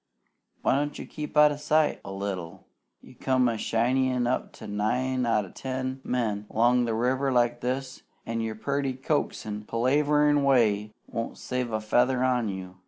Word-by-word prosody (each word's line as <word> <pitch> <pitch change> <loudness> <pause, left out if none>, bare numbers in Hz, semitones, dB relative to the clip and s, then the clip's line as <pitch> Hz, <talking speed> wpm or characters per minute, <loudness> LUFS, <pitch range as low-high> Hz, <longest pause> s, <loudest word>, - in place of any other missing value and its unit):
Why - - +3
don't 145 +1 -2
you - - -6
keep 150 -1 -6
out 150 0 +7
o' 145 - -4
sight 150 +1 +1
a 100 - -7
little? 95 -4 -5 0.4
You - - -15
come 130 -1 +1
a 115 - 0
shinneyin' 125 +3 +1
up 125 +2 -1
to - - -11
nine 125 +5 0
out 105 -3 +2
o' 90 - -13
ten 130 0 -4
men 105 -4 -1
'long 120 +2 +3
the 115 -1 -1
river 130 +4 +1
like 120 -1 +2
this, 130 +1 -3 0.2
an' 115 0 -2
your 110 -1 -3
purty, 140 +3 -1
coaxin', 110 -6 -2
palaverin' 145 +4 +3
way 110 -6 +3
won't 115 -1 -5
save 125 -2 -3
a 110 - 0
feather 125 +4 +2
on 125 -4 +1
you. 95 -1 -7
125 Hz, 170 wpm, -27 LUFS, 110-130 Hz, 0.4 s, out